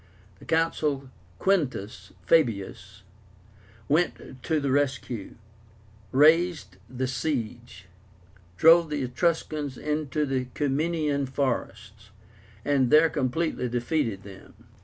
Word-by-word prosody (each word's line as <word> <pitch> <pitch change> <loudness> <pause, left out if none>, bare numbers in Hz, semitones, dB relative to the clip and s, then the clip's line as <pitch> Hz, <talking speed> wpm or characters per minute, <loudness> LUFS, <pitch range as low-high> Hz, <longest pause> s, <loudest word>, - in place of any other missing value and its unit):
The - - -14
Consul 150 -4 0 0.3
Quintus 145 - -1
Fabius 100 - 0 0.8
went 150 -4 -1
to 155 +4 0
the 140 -2 -1
rescue, 130 -6 -2 0.8
raised 155 - +3
the 130 +1 -3
siege, 120 - -4 0.7
drove 165 0 +6
the 150 -2 -2
Etruscans 145 0 -1
into 150 -1 -2
the 130 -2 -2
Ciminian 145 0 0
forests, 115 -6 -4 0.6
and 135 -3 +2
there 155 +2 +5
completely 130 -1 -1
defeated 120 -4 -1
them. 95 -1 -14
140 Hz, 95 wpm, -26 LUFS, 120-155 Hz, 0.8 s, drove